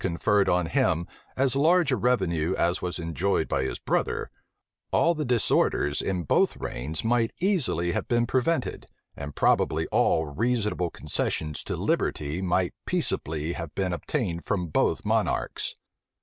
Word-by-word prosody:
conferred 95 +3 +2
on 90 -1 +2
him 80 +1 +1 0.3
as 135 0 +2
large 165 +2 +4
a - - +3
revenue 95 -9 +1
as 85 +2 +1
was 90 -1 -2
enjoyed 85 +3 0
by - - 0
his 65 - -2
brother, - - -1 0.6
all 170 - +3
the 155 -2 -3
disorders 115 - +2
in 90 -3 -2
both 70 - +2
reigns 75 +7 -4
might 115 0 +2
easily 155 - +1
have - - -2
been 120 0 +2
prevented, 130 +7 -1 0.3
and 70 0 -7
probably - - +2
all 80 - +2
reasonable 105 - -1
concessions 75 -2 -2
to - - -4
liberty 75 +5 -1
might 90 -1 +1
peaceably 80 +1 -1
have 80 -3 -7
been 95 -2 -1
obtained 85 +1 -2
from 90 -4 -2
both - - +1
monarchs. - - -1
90 Hz, 145 wpm, -26 LUFS, 80-120 Hz, 0.6 s, large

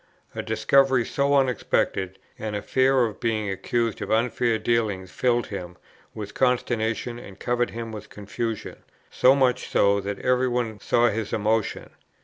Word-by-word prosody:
A - - -3
discovery 125 +3 +3
so 140 0 +1
unexpected, 120 -8 0 0.2
and 105 -1 -4
the 105 - -3
fear 130 -1 +3
of 110 -2 -6
being 110 -3 -1
accused 115 +4 -1
of - - -4
unfair 115 0 +1
dealing 110 -5 0
filled 120 +6 0
him 90 -3 -7 0.4
with 105 -1 -6
consternation, 120 -2 0
and 100 -4 -12
covered 120 0 0
him 115 0 -6
with 110 -1 -8
confusion, 110 +2 -5 0.3
so 130 +2 +5
much 130 -3 +1
so, 100 0 +3
that 100 +1 -4
every 125 0 +1
one 120 -4 -2
saw 120 0 +3
his 110 -1 -3
emotion. 110 +1 -1
115 Hz, 150 wpm, -25 LUFS, 105-125 Hz, 0.4 s, so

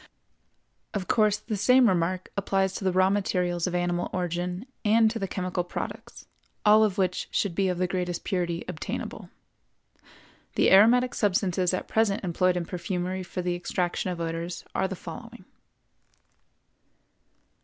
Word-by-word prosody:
Of 190 -2 -3
course, 215 -2 +3
the 220 0 -4
same 250 +5 +5
remark 185 -1 0
applies 195 -1 0
to 195 - -5
the 190 - +2
raw 185 +1 +3
materials 180 -3 0
of 180 - -2
animal 175 0 0
origin 180 +2 -3 0.2
and 220 0 +4
to 230 - -4
the 195 - -2
chemical 180 -1 -2
products, 175 - -7 0.4
all 215 +1 +7
of 205 -2 +1
which 185 -2 0
should 200 -4 0
be 195 +2 +1
of 180 -1 -1
the 185 - +1
greatest 180 -1 -3
purity 175 -3 -2
obtainable. 180 -3 -5 1.3
The - - +3
aromatic 240 +6 +6
substances 185 -3 +1
at 185 - -3
present 220 -3 +1
employed 180 0 +1
in 175 - -2
perfumery 180 +1 -3
for 180 0 -5
the 180 0 0
extraction 175 +1 -2
of 175 -2 -4
odors 165 +1 -4
are 190 - +1
the 190 - -5
following. 230 +8 -10
185 Hz, 150 wpm, -27 LUFS, 175-200 Hz, 1.3 s, all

